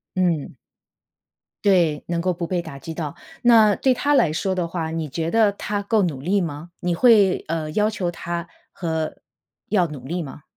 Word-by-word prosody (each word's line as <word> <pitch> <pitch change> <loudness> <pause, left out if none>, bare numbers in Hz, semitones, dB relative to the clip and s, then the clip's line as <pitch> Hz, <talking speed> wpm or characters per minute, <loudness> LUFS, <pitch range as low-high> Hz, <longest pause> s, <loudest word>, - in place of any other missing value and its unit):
嗯。 175 -5 0 1.1
对， 170 -7 +3
能 170 -1 -1
够 180 +1 0
不 170 0 -4
被 180 +1 -1
打 160 -5 -8
击 160 +4 -7
到。 155 -3 -4 0.3
那 220 -4 +6
对 260 -1 +2
他 285 +4 0
来 175 - +4
说 190 +4 -1
的 175 -2 -1
话 165 -2 -3
你 160 -1 -3
觉 165 +4 -2
得 225 -2 +4
他 205 0 -3
够 210 +1 +2
努 155 -8 -2
力 185 +8 +1
吗？ 155 0 -5
你 175 -1 0
会， 205 -1 +5
呃， 155 -1 -2
要 210 +7 +2
求 190 -5 -2
他 170 0 -5 0.2
和 160 -3 -3 0.5
要 185 -5 +3
努 145 -5 -9
力 175 +3 -2
吗？ 145 -1 -9
175 Hz, 200 characters per minute, -22 LUFS, 160-200 Hz, 1.1 s, 那